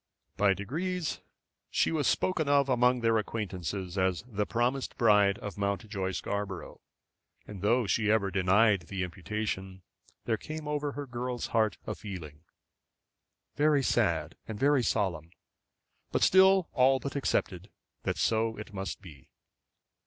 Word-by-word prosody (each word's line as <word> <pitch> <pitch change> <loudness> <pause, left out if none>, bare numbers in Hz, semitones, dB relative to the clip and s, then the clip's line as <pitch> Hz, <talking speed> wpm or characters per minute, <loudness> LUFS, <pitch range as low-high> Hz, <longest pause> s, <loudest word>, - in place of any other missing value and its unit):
By 100 -1 +3
degrees 165 - -3 0.5
she - - +1
was 155 -4 0
spoken 160 -6 +1
of 140 -1 +3
among 125 0 +3
their 115 -1 +3
acquaintance 100 -6 -4
as 95 -1 -1
the 105 -4 -2
promised 125 +3 -1
bride 105 -3 +4
of 105 0 -7
Mountjoy 100 -1 -2
Scarborough, 100 +1 -4 0.6
and 100 -3 -9
though 115 +4 +2
she 105 +1 +1
ever 105 -3 +2
denied 95 0 +3
the 95 -1 -3
imputation, 95 +1 -4 0.4
there 115 -2 +1
came 155 +5 -7
over 145 -1 -2
her 145 0 -5
girl's 125 -1 -4
heart 110 -2 +2
a - - -3
feeling, 80 -8 -8 1.1
very 145 -2 +3
sad 85 - +1
and 110 -2 -6
very 140 -1 +4
solemn, 90 -9 -1 0.8
but - - +1
still 190 -1 +6
all 130 +1 +4
but 140 +1 -5
accepted, 95 -9 -1 0.3
that - - -2
so 110 0 +1
it 105 0 -9
must 95 0 -5
be. 75 -8 -14
110 Hz, 140 wpm, -30 LUFS, 95-130 Hz, 1.1 s, still